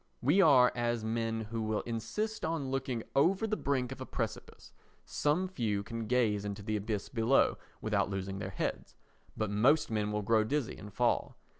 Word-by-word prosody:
We 150 +10 +4
are 130 -8 +6
as 120 -2 -1
men 115 0 -1
who 115 -1 -2
will 110 -1 -1
insist 120 - -3
on 160 -5 -2
looking 130 -4 -2
over 185 +10 +3
the 215 -1 0
brink 130 - -1
of 130 - -7
a - - -4
precipice; - - -5 0.3
some 155 +6 0
few 110 - -1
can 115 +1 -5
gaze 110 -5 +2
into 100 0 -5
the 110 +1 -1
abyss 105 0 -2
below 120 +2 +2 0.2
without - - +1
losing 95 0 -4
their 95 - -4
heads, 95 - -4 0.4
but 110 -2 -1
most 120 +8 +3
men 105 -1 0
will 105 0 -1
grow 110 +1 +3
dizzy 135 +3 -1
and 105 0 -9
fall. 120 +4 0
115 Hz, 180 wpm, -32 LUFS, 105-135 Hz, 0.4 s, are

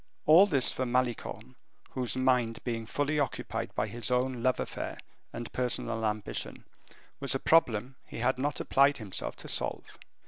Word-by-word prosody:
All 170 +6 +8
this 140 -9 +3
for 130 - -2
Malicorne, 125 -1 -2 0.4
whose 125 -2 -2
mind 125 -3 +2
being 115 -2 -3
fully 145 +4 0
occupied 140 -4 -3
by - - +1
his 120 -3 -3
own 125 0 0
love 130 0 +2
affair - - -4 0.3
and 120 -1 -7
personal 120 -2 -1
ambition, 105 -1 -4 0.5
was 140 -1 -1
a - - 0
problem 130 -6 +2
he - - -8
had 120 +2 +1
not 145 +1 -1
applied 140 +1 +3
himself 105 -5 -4
to - - -9
solve. - - -3
125 Hz, 160 wpm, -30 LUFS, 115-135 Hz, 0.5 s, All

